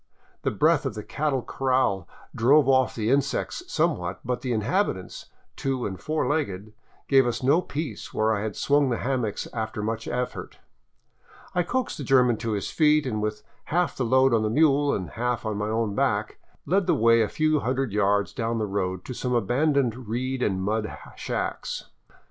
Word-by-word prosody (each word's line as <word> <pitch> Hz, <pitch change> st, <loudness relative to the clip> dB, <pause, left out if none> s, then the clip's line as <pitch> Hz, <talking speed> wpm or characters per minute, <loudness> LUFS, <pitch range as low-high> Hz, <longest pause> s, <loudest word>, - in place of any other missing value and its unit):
The -, -, 0 dB
breath -, -, +2 dB
of -, -, -5 dB
the -, -, -5 dB
cattle 140 Hz, -4 st, -1 dB
corral 130 Hz, -6 st, 0 dB, 0.3 s
drove 135 Hz, +5 st, +4 dB
off 130 Hz, -1 st, +3 dB
the 110 Hz, +1 st, 0 dB
insects 140 Hz, -, 0 dB
somewhat, 95 Hz, -, 0 dB
but 125 Hz, 0 st, -2 dB
the 125 Hz, -, -3 dB
inhabitants, 110 Hz, -, -1 dB, 0.3 s
two 135 Hz, -2 st, -2 dB
and 95 Hz, -2 st, -4 dB
four 155 Hz, 0 st, -1 dB
legged, 110 Hz, -9 st, -2 dB, 0.3 s
gave 135 Hz, -2 st, +5 dB
us 120 Hz, -, -2 dB
no 145 Hz, +7 st, +4 dB
peace 155 Hz, -2 st, -5 dB
where 110 Hz, +1 st, +1 dB
I 100 Hz, -, -2 dB
had 105 Hz, -1 st, -3 dB
swung 145 Hz, -1 st, +2 dB
the 120 Hz, -, 0 dB
hammocks 125 Hz, -5 st, -2 dB
after 110 Hz, -2 st, -3 dB
much 110 Hz, +1 st, -3 dB
effort 125 Hz, 0 st, -4 dB, 1.0 s
I 180 Hz, -, +2 dB
coaxed 250 Hz, +5 st, -2 dB
the -, -, -3 dB
German 125 Hz, -3 st, +4 dB
to 115 Hz, 0 st, -2 dB
his 100 Hz, -, -3 dB
feet, 150 Hz, -2 st, +3 dB
and 110 Hz, -5 st, -2 dB
with 105 Hz, 0 st, -3 dB, 0.2 s
half 175 Hz, +2 st, 0 dB
the 130 Hz, -, -1 dB
load 130 Hz, +2 st, +4 dB
on 115 Hz, -, +3 dB
the 110 Hz, -, 0 dB
mule, 145 Hz, 0 st, +3 dB
half 120 Hz, 0 st, -2 dB
on 110 Hz, -2 st, -2 dB
my 105 Hz, +1 st, -2 dB
own 110 Hz, -2 st, 0 dB
back, -, -, 0 dB, 0.3 s
led 190 Hz, +4 st, +1 dB
the -, -, +4 dB
way 115 Hz, +1 st, +5 dB
a 110 Hz, -, +1 dB
few 155 Hz, -1 st, +1 dB
hundred 130 Hz, -3 st, -1 dB
yards 100 Hz, -1 st, +1 dB
down 115 Hz, 0 st, -2 dB
the 110 Hz, -, 0 dB
road 95 Hz, -2 st, -2 dB
to 125 Hz, -, -5 dB
some 125 Hz, 0 st, -2 dB
abandoned 125 Hz, +1 st, +1 dB
reed 130 Hz, +3 st, -2 dB
and 95 Hz, -5 st, 0 dB
mud 110 Hz, +2 st, -2 dB, 0.2 s
shacks. -, -, -4 dB
125 Hz, 185 wpm, -25 LUFS, 110-140 Hz, 1.0 s, gave